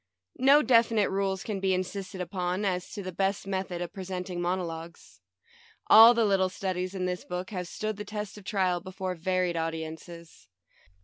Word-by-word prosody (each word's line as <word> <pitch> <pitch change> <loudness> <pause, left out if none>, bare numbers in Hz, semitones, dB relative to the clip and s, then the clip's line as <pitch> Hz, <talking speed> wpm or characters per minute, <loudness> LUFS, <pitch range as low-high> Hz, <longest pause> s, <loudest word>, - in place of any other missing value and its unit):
No 280 +4 +6
definite 230 -4 +3
rules 195 -1 -1
can 210 -3 -3
be 190 -1 +1
insisted 185 0 -4
upon 180 +2 -2
as 180 -2 -1
to 205 - -5
the 185 - -5
best 195 +2 -1
method 190 -2 -3
of 175 - -8
presenting 185 -2 -5
mono 180 +1 0
logues. 165 0 -9 0.7
All 225 +2 +10
the 230 -1 +3
little 190 -2 +2
studies 185 0 -3
in 185 -1 -2
this 180 0 -3
book 180 +2 -5
have 180 -3 -4
stood 215 +3 -4
the 210 - -5
test 210 -1 -5
of 210 - -12
trial 185 -3 0
before 185 +1 -5
varied 180 0 -1
au 165 0 0
diences. 160 +1 -9
185 Hz, 180 wpm, -28 LUFS, 180-200 Hz, 0.7 s, All